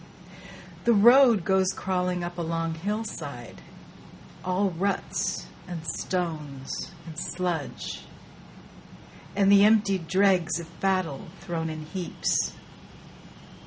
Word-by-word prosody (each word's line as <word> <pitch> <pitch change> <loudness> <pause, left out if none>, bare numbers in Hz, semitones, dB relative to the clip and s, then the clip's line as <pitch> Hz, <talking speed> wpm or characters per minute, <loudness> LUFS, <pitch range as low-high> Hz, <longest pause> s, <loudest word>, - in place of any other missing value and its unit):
The 235 - +5
road 235 -2 +7
goes 190 0 +3
crawling 180 -2 -1
up 175 0 -5
a - - 0
long 165 0 -1
hillside, 210 +7 -5 0.8
All 185 +2 +1
ruts 195 +4 -1 0.2
and 170 -2 -6
stones 155 -5 -3
and 160 -1 -7
sludge, 175 -5 -3 1.3
and 200 0 +4
the 200 0 +8
emptied 200 -5 +3
dregs 185 -2 +3
Of 170 0 -11
battle 185 -7 0
thrown 165 -3 -3
in 155 -1 -6
heaps. 180 +2 -1
180 Hz, 100 wpm, -27 LUFS, 165-195 Hz, 1.3 s, the